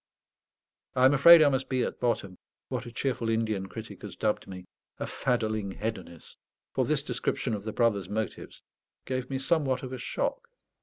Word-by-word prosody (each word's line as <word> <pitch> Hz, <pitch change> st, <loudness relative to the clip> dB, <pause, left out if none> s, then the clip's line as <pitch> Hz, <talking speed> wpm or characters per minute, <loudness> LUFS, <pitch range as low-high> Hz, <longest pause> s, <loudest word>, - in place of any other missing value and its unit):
I 125 Hz, -, +5 dB
am 135 Hz, -, +6 dB
afraid 160 Hz, +3 st, +9 dB
I 145 Hz, -, +5 dB
must 135 Hz, -1 st, -1 dB
be 130 Hz, -2 st, +1 dB
at -, -, -4 dB
bottom, 100 Hz, -6 st, -1 dB, 0.3 s
what -, -, -3 dB
a -, -, -8 dB
cheerful 120 Hz, -2 st, -1 dB
Indian 110 Hz, -4 st, 0 dB
critic 110 Hz, +2 st, -9 dB
has -, -, -7 dB
dubbed 110 Hz, -1 st, -1 dB
me, 90 Hz, -1 st, -8 dB, 0.3 s
"a -, -, -3 dB
faddling 110 Hz, -5 st, -1 dB
hedonist," 95 Hz, -7 st, -6 dB, 0.3 s
for -, -, +1 dB
this -, -, 0 dB
description -, -, -2 dB
of 105 Hz, -1 st, -4 dB
the 110 Hz, -, -2 dB
brother's 105 Hz, -6 st, +1 dB
motives 110 Hz, 0 st, -4 dB, 0.4 s
gave 130 Hz, -1 st, -3 dB
me 135 Hz, -, -1 dB
somewhat 135 Hz, -2 st, +1 dB
of 130 Hz, 0 st, -6 dB
a 130 Hz, -, -5 dB
shock. 470 Hz, -, -2 dB
115 Hz, 175 wpm, -28 LUFS, 105-130 Hz, 0.4 s, afraid